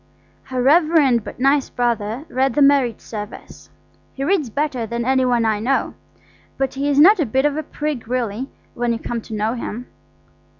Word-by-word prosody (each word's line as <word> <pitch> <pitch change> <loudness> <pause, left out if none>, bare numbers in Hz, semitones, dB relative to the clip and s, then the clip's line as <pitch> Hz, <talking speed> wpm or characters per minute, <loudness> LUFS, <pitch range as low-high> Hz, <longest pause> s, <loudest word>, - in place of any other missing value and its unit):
Her 255 -2 -2
reverend 295 - +4
but - - -9
nice 275 +1 +2
brother 235 +2 -2
read 260 -1 0
the 295 - +2
marriage 275 -5 +3
service. 210 -2 -9 0.5
He 270 - -4
reads 310 -4 +1
better 260 -2 -2
than 235 +1 -3
any 260 0 +2
one 240 -2 +2
I 215 -2 +1
know, 260 +5 0 0.6
but 270 -1 -1
he 275 +2 -1
is 280 - +1
not 375 +6 +7
a 315 - +2
bit 265 +5 +1
of 295 -1 +1
a 310 - -1
prig 295 -5 -5
really, 245 +1 -2 0.2
when 240 0 -1
you - - -2
come 235 0 -4
to 220 - -8
know 215 +2 -1
him. 240 0 -5
255 Hz, 185 wpm, -20 LUFS, 235-285 Hz, 0.6 s, not